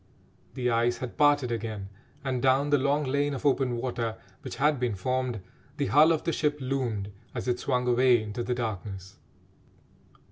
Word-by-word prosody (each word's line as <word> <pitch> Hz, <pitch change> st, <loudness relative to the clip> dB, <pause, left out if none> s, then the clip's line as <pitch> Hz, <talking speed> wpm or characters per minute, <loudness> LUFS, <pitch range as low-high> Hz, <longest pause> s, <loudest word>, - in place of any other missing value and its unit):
The 125 Hz, -1 st, 0 dB
ice 120 Hz, +1 st, +2 dB
had 125 Hz, -2 st, -6 dB
parted 145 Hz, -4 st, +3 dB
again, 110 Hz, -4 st, -4 dB, 0.3 s
and, 130 Hz, -3 st, -1 dB
down 135 Hz, +3 st, +3 dB
the 145 Hz, -, +5 dB
long 140 Hz, +2 st, +1 dB
lane 140 Hz, +1 st, 0 dB
of 130 Hz, -, -7 dB
open 130 Hz, -3 st, +2 dB
water 115 Hz, -2 st, -3 dB, 0.2 s
which -, -, -7 dB
had 145 Hz, -1 st, +2 dB
been 120 Hz, -4 st, 0 dB
formed, 125 Hz, +2 st, -2 dB, 0.4 s
the 145 Hz, -, 0 dB
hull 155 Hz, +3 st, +7 dB
of 160 Hz, -, 0 dB
the 165 Hz, -, 0 dB
ship 150 Hz, -1 st, 0 dB
loomed 125 Hz, -7 st, -2 dB, 0.2 s
as -, -, -4 dB
it 125 Hz, 0 st, 0 dB
swung 125 Hz, -2 st, 0 dB
away 125 Hz, 0 st, +5 dB
into 110 Hz, +1 st, -5 dB
the 125 Hz, +1 st, -1 dB
darkness. 100 Hz, -4 st, -5 dB
125 Hz, 175 wpm, -28 LUFS, 115-140 Hz, 0.4 s, hull